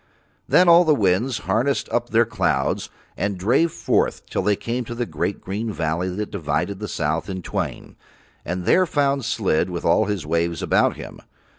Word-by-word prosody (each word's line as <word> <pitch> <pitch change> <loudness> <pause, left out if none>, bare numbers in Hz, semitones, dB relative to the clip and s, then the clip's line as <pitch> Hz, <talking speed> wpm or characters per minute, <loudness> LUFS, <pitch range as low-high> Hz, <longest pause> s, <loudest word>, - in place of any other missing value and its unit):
Then 180 - +5
all 170 +1 +8
the 155 -3 +3
winds 110 +3 +1
harnessed 130 +5 0
up 120 0 -1
their 115 +1 +4
clouds 65 -11 -1 0.3
and 100 -1 -2
drave 125 - +2
forth - - 0
till - - -2
they 105 - +2
came 120 +4 -3
to 120 - -6
the 120 0 -2
great 100 - -3
green 105 +4 -3
valley 85 0 -1
that 100 +3 -4
divides 85 0 -2
the 105 +2 -5
south 80 +2 -2
in 95 -2 -5
twain, - - -4 0.5
and 90 +2 -4
there 185 0 +4
found 140 -4 +1
Slid 110 -8 0
with 85 -1 -5
all 95 +6 +4
his 100 -5 -3
waves 85 0 -1
about - - +2
him. - - -10
105 Hz, 180 wpm, -22 LUFS, 90-120 Hz, 0.5 s, all